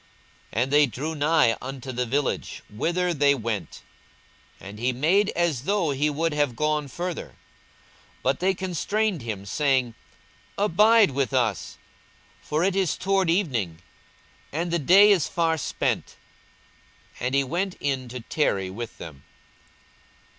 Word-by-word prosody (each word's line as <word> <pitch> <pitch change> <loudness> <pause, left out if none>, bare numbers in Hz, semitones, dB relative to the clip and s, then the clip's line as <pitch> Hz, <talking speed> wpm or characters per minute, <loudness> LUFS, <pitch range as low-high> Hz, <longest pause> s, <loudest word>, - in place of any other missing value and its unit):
42:024:028 115 - +2
And 135 - -5
they 145 0 +6
drew 140 +8 -4
nigh 150 -6 +3
unto 135 0 -6
the 125 0 -2
village, 140 +3 -2
whither 175 +11 0
they 140 -2 +3
went: 110 - -5 0.8
and 100 +2 -10
he 125 +2 +1
made 175 - +2
as 160 -7 0
though 200 -6 +1
he 145 +2 +1
would 160 +2 -1
have 145 -5 0
gone 150 +1 0
further. 175 +5 -4
42:024:029 - - -20 0.9
But 135 +1 +1
they 190 +2 +2
constrained 190 +1 -1
him, 105 -4 -5
saying, 130 +1 +1 0.6
Abide 210 +1 +4
with 135 0 -1
us: 115 -7 -1 0.6
for 155 +3 -1
it 190 0 +1
is 190 -6 +1
toward 195 -2 +1
evening, 125 - 0 0.7
and 170 +3 -2
the 170 - +1
day 195 +8 +6
is 185 -7 +3
far 165 -1 +1
spent. 150 - -2 1.0
And 125 +2 -1
he 140 - +3
went 175 +7 -2
in 135 -3 -2
to 125 0 -7
tarry 100 -8 -1
with 115 +3 -7
them. 75 -5 -10
145 Hz, 145 wpm, -25 LUFS, 125-175 Hz, 1.0 s, they